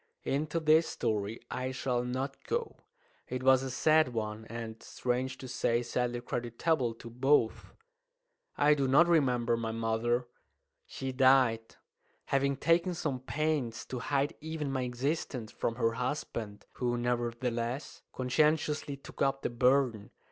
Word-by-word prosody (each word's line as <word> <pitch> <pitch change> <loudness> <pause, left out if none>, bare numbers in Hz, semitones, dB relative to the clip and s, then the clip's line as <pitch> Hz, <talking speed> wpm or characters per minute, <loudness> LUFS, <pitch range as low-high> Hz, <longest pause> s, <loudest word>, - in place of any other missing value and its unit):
Into 155 +4 -1
this 160 +1 +4
story 105 0 -2
I 130 0 -2
shall 125 -1 -1
not 130 +2 -4
go. 470 0 -2 0.5
It 125 0 -4
was 130 0 +6
a 135 - -3
sad 155 -1 +3
one, 110 0 -3
and, 115 -1 -7
strange 130 +1 -2
to 130 - -8
say, 120 -1 0
sadly 120 0 -1
creditable 120 +2 -1
to 115 - -11
both. 125 -1 +1 0.8
I 145 +1 +5
do 140 -2 +1
not 145 +6 +6
remember 125 -8 +3
my 115 -1 -3
mother. 115 +2 0 0.6
She 135 0 -4
died, 130 -4 +3 0.5
having 140 0 +1
taken 170 +4 +2
some 140 -5 -2
pains 140 -4 -1
to 125 - -5
hide 140 +3 0
even 155 -2 -3
my 130 -1 -1
existence 125 -2 -2
from 115 - -2
her 115 -2 +1
husband, 115 -4 -4
who, 120 -1 0
nevertheless, 120 +1 -2
conscientiously 150 +2 +1
took 140 - -12
up 135 0 +1
the - - -1
burden. 125 -3 +2
130 Hz, 140 wpm, -31 LUFS, 120-140 Hz, 0.8 s, was